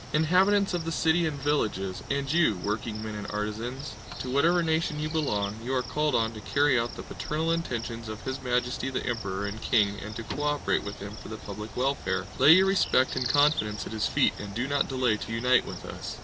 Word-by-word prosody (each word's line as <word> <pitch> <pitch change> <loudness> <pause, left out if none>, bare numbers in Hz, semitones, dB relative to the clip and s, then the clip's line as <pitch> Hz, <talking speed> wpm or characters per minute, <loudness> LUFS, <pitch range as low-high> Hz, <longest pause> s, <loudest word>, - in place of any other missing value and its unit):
Inhabitants 185 +6 +3
of 175 -2 -1
the 165 - -3
city 165 +1 +2
and 145 -2 -4
villages, 105 -10 -1
and 140 0 -1
you, 170 -11 +4
workingmen 110 +1 -3
and 105 -1 -5
artisans, 115 +7 -4 0.2
to 130 - -5
whatever 170 +6 +3
nation 160 -1 0
you 155 0 -2
belong, 105 -11 0
you 130 +2 -1
are 125 - +1
called 150 0 0
on 115 -1 +2
to 110 - -8
carry 140 +3 +3
out 115 +1 -3
the - - -7
paternal 160 +2 -2
intentions 115 -8 -3
of 110 0 -7
His 130 +1 -4
Majesty 125 +1 -1
the 130 - -3
Emperor 100 -5 -2
and 105 +2 -5
King 105 -4 +2
and 105 +1 -7
to 115 - -5
co 145 - -5
operate 145 0 0
with 100 0 -7
him 100 +1 -7
for - - -10
the 110 - -6
public 105 0 -8
welfare! 135 +2 0
Lay 140 +4 +9
your 190 +2 +6
respect 190 -9 +3
and 130 -2 0
confidence 145 -8 +2
at - - -7
his 110 -1 0
feet - - +3
and 100 -1 -7
do 120 +3 -1
not 140 0 +1
delay 130 -5 +1
to 115 - -7
unite 125 +3 +3
with - - -7
us! - - -7
125 Hz, 220 wpm, -28 LUFS, 110-150 Hz, 0.2 s, Lay